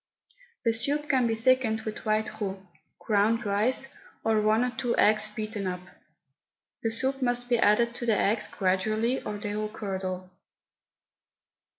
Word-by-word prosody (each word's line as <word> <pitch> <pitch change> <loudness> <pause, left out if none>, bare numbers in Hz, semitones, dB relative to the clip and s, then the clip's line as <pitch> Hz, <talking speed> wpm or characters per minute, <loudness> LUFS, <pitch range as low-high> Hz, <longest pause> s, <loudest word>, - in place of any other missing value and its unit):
The 230 - +3
soup 290 +6 0
can 260 -4 +3
be 225 - 0
thickened 230 -1 +2
with 215 0 -6
white 215 0 0
roux, 195 -1 -4 0.3
ground 220 +2 +1
rice, 220 +7 +1 0.3
or 220 -1 +2
one 215 +2 +3
or 250 - 0
two 240 +1 -1
eggs 215 0 +4
beaten 215 -2 -3
up. 180 0 -3 1.0
The 225 - 0
soup 265 +4 -1
must 245 -1 0
be 240 -1 +3
added 235 +3 +4
to 240 0 -5
the 220 -3 +3
eggs 210 +2 +1
gradually 215 +6 0
or 210 - -5
they 205 0 -4
will 215 0 -2
curdle. 185 -3 -5
220 Hz, 155 wpm, -28 LUFS, 205-240 Hz, 1.0 s, eggs